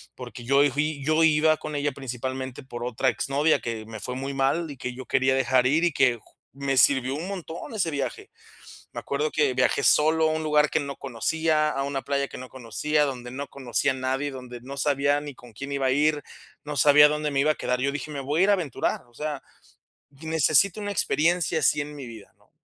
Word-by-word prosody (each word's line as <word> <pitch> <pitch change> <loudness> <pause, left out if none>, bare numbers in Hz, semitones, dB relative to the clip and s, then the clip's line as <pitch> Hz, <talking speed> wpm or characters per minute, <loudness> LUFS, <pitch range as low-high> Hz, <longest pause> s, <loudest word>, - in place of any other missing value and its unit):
porque 125 -1 -9
yo 140 +3 +4
fui 150 +1 -2
yo 155 +3 +2
iba 155 0 +4
con 150 -1 -6
ella 145 0 0
principalmente 130 0 -5
por 120 -2 -7
otra 125 +2 -1
exnovia 140 +6 +1
que 115 -2 -5
me 110 0 -8
fue 125 - -5
muy 135 +2 -4
mal, 140 +5 0
y - - -8
que 125 0 -5
yo 130 +1 -9
quería 130 +1 +2
dejar 130 -1 +3
ir 155 +6 +2
y 170 - +1
que 130 -4 +3
ju 110 - -24 0.2
me 135 0 -2
sirvió 130 +1 +4
un 160 +5 -5
montón 180 +1 -7
ese 180 -6 0
viaje, 135 -4 -4 0.6
me - - -5
acuerdo 150 +2 -2
que 150 -4 +1
viajé 130 +2 +2
solo 160 +1 +4
a - - 0
un 160 0 -2
lugar 150 -1 +3
que 160 - +1
no 140 -1 -5
conocía, 155 +5 0
a 135 - -2
una 140 -1 -2
playa 140 0 -1
que - - -9
no 130 - -9
conocía, 140 +5 -1
donde 125 -3 -5
no 140 +3 -6
conocía 135 +1 -1
a - - -7
nadie, 130 +2 -2
donde 125 -2 -9
no 135 +2 -8
sabía 145 0 +1
ni 145 -1 -8
con 120 -1 -16
quién 140 +6 -7
iba 140 -1 0
a - - +3
ir, 150 +1 +2 0.4
no 150 0 -5
sabía 150 0 +7
dónde 150 0 -1
me 140 -1 +1
iba 150 +2 +3
a - - -12
quedar. 125 0 -1
Yo 140 +1 0
dije: 145 +1 -5
"Me 145 -2 -5
voy 145 +4 -1
a - - +6
ir - - +2
a - - +6
aventurar, 165 -10 -2
o 120 - -26
sea, 150 +1 -4 0.7
necesito 160 +6 +2
una 205 0 -3
experiencia 170 -2 +1
así 150 - +3
en 145 +1 -6
mi 135 -3 -8
vida", 115 -3 -12
¿no? - - -30
140 Hz, 230 wpm, -25 LUFS, 130-150 Hz, 0.7 s, sabía